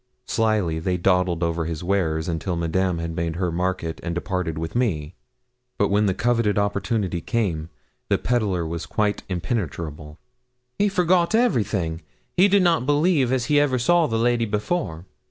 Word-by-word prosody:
Slyly 110 -9 +1
they 90 +2 -1
dawdled 90 -1 +1
over 85 -1 -1
his 80 0 -4
wares, 85 -4 0
until 85 +1 -2
Madame 85 +2 0
had 85 0 -4
made 85 -1 -2
her 90 -1 -1
market 90 -1 -2
and 85 -1 -4
departed 90 -2 -2
with 80 0 -4
me. 90 -11 0 0.6
But 100 - +2
when 105 +1 +2
the 95 - +1
coveted 115 -2 +1
opportunity 100 -2 -1
came, 90 -10 -1 0.4
the - - +3
pedlar 105 -8 0
was 85 0 -5
quite 105 -1 0
impenetrable. 85 - -4 0.6
'He 205 0 +3
forgot 180 0 +2
everything; 105 - +1 0.3
he 185 +3 +6
did 200 -1 +4
not 165 -7 +2
believe 145 -3 +3
as 130 -3 +1
he 145 +3 +3
ever 140 -3 +2
saw 170 +6 +3
the 115 - -1
lady 120 0 +2
before. 105 - -2
95 Hz, 160 wpm, -23 LUFS, 85-120 Hz, 0.6 s, he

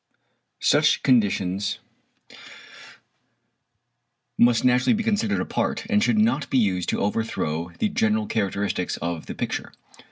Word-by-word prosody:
Such - - +3
conditions 100 -5 +1 2.6
must 120 0 +3
naturally 125 - +3
be 225 - -2
considered 215 -1 0
apart, - - -2
and 210 0 +3
should 225 - +2
not 215 -9 +1
be 135 - +1
used 95 -6 +1
to - - -1
overthrow 90 -6 -2
the 220 - +1
general 220 0 +1
characteristics 100 - -2
of 85 -2 -5
the - - -6
picture. - - -4
120 Hz, 120 wpm, -24 LUFS, -, 2.6 s, Such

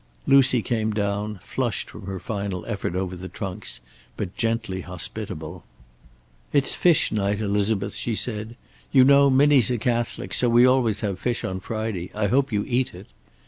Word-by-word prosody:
Lucy 130 -4 +5
came 110 +2 -1
down, 105 -1 -2
flushed - - -2
from 95 - -10
her 95 -1 -4
final 100 -2 -4
effort 100 -5 -3
over 95 -1 -2
the 90 +1 -8
trunks, 95 -9 -6 0.4
but 90 - -4
gently 115 -5 -2
hospitable. 90 -2 -6 0.9
"It's 140 -2 +3
fish 175 -4 +3
night, 100 -1 0
Elizabeth," 100 -1 0
she 115 - -3
said. 110 0 -3 0.4
"You 130 -2 +6
know 140 +1 +6
Minnie's 135 -3 +5
a 125 - 0
Catholic, 120 +1 -2
so 125 - +3
we 120 +1 +6
always 125 -5 +2
have 100 -4 -2
fish 120 +2 -2
on 95 0 -3
Friday. 110 -3 -4
I 105 0 0
hope 135 +6 +1
you 105 -1 0
eat 125 -5 0
it." 95 +5 -12
110 Hz, 165 wpm, -24 LUFS, 100-120 Hz, 0.9 s, You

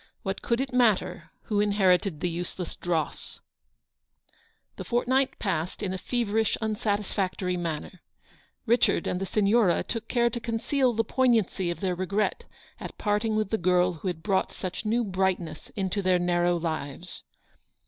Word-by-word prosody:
What 195 0 -3
could 235 0 0
it 265 -1 -2
matter 235 -6 +2
who 210 -2 0
inherited 195 -4 +2
the - - +1
useless 175 +1 -5
dross? 165 -4 -3 1.4
The - - -5
fortnight 260 +3 +1
passed 180 -1 -2
in 185 -2 -1
a 190 - -4
feverish 225 -1 0
unsatisfac 205 -3 -1
tory 180 -1 -1
manner. 170 +1 -4 0.6
Richard 235 -6 +3
and 180 - -2
the 195 - -2
Signora 205 -1 +3
took 230 -2 -5
care 235 -1 +2
to 240 - -3
conceal 240 +3 0
the 225 0 +1
poignancy 225 -8 +2
of 175 - -4
their 185 -2 0
regret 190 +4 -1 0.3
at - - -8
parting 210 +1 0
with 215 -2 0
the 220 - +1
girl 180 0 +3
who 165 +3 -6
had 165 -3 -3
brought 195 -2 +1
such 185 +4 -5
new 235 +3 +2
bright 190 -2 +1
ness 155 -3 -9
into 195 0 -1
their 185 -1 +3
narrow 175 0 +2
lives. 160 0 -4
195 Hz, 160 wpm, -27 LUFS, 180-225 Hz, 1.4 s, Richard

